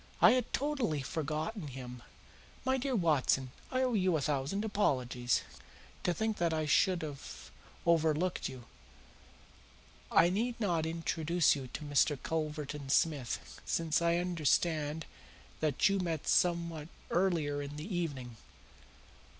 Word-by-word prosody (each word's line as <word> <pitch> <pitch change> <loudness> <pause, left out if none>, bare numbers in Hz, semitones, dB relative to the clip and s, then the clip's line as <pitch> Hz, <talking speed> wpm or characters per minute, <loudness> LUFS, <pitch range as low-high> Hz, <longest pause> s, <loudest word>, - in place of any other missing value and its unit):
"I - - +8
had 250 -2 +1
totally 260 - 0
forgotten 155 - -3
him. 125 -2 -8 0.6
My 265 0 +2
dear 265 0 -1
Watson, 145 - +2 0.2
I 255 0 +1
owe 255 -1 +1
you 185 -5 +3
a - - -2
thousand 145 +9 -1
apologies. 125 - +1 0.6
To 180 - +1
think 220 +4 -1
that 170 -1 +1
I 155 -1 0
should 175 +4 +3
have 145 -3 -8 0.3
overlooked 165 +1 +2
you! 130 -2 -10 1.5
I 170 +2 +5
need 235 +5 -1
not 170 -7 +1
introduce 165 0 +2
you 135 -2 -6
to 140 - -7
Mr. 145 0 +3
Culverton 150 -2 -3
Smith, 140 -4 0
since 165 -1 0
I 170 0 +3
understand 160 -2 +1 0.5
that 155 +5 +2
you 195 -1 +1
met 165 -4 -2
somewhat 170 -3 +1 0.2
earlier 165 -6 +1
in 145 +1 -6
the 170 +6 -5
evening. 135 -9 -3
160 Hz, 130 wpm, -33 LUFS, 145-180 Hz, 1.5 s, I